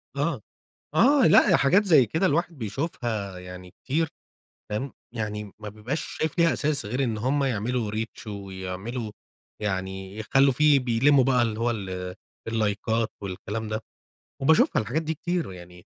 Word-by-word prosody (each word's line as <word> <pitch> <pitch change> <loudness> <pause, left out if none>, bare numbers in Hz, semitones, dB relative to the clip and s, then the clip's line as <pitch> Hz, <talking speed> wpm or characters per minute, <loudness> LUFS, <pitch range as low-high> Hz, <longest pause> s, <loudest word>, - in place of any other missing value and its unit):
آه، 145 -3 -1 0.5
آه 265 - +5
لأ، - - +6
هي 170 - +6
حاجات 185 +9 +4
زي 155 - +6
كده 160 - +1
الواحد 170 0 0
بيشوفها 110 - -3
يعني 90 0 -10
كتير، 155 - -1 0.6
فاهم؟ 115 +6 -3 0.2
يعني 105 -2 -4
ما 105 - -7
بيبقاش 110 +8 -4 0.2
شايف 160 +2 -2
ليها 170 -1 +5
أساس، 145 -6 +1
غير 125 +6 0
إن 115 -3 -2
هُم 135 +5 +1
يعملوا 120 -2 -1
Reach 110 +1 -5
ويعملوا 100 +3 -5 0.5
يعني 95 -1 -3
يخلّوا 135 +5 +3
فيه 150 +2 +5
بيلموا 130 +3 +4
بقى 125 -2 +3
اللي 115 -2 -1
هو 120 +1 +2
ال 95 -4 -4 0.3
اللَّايكات 110 0 0
والكلام 100 +3 -4
ده، 110 0 -2 0.6
وباشوفها 160 +4 +4
الحاجات 125 +9 -1
دي 160 0 -2
كتير، 175 +2 -2
ويعني 90 -1 -12
115 Hz, 150 wpm, -26 LUFS, 105-140 Hz, 0.6 s, لأ